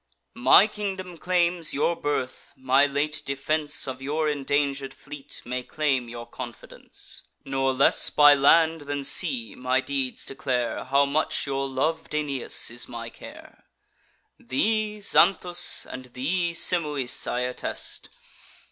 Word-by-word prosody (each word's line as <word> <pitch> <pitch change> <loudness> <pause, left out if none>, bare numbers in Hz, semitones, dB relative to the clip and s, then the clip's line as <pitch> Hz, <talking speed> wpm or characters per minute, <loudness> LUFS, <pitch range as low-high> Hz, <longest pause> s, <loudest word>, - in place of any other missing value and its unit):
My 130 +10 +6
kingdom 195 -4 -5
claims 175 -2 0
your 165 +4 +1
birth; 145 -5 -4
my 130 +2 +3
late 150 +2 -1
defence 145 +2 -1
Of 130 0 -6
your 150 +3 -1
indanger'd 140 -1 -1
fleet 135 +1 -9
may 125 +1 -3
claim 135 -3 -1
your 120 0 -8
confidence. 120 -3 -8 0.2
Nor 135 0 0
less 135 +2 +4
by 145 -1 +7
land 160 +3 +4
than 145 -1 -2
sea 135 - -1
my 125 +1 0
deeds 135 -1 -2
declare 125 -3 -2
How 140 +2 +3
much 145 +3 0
your 135 -1 -2
lov'd 155 +4 -2
Aeneas 140 -6 0
is 120 0 -1
my 115 -1 -7
care. - - -14 0.7
Thee, 215 +8 -1
Xanthus, 180 -3 +3
and 130 0 -9
thee, 170 +6 -1
Simois, 150 -8 +2
I 125 - -1
attest. 125 0 -3
140 Hz, 130 wpm, -25 LUFS, 130-160 Hz, 0.7 s, by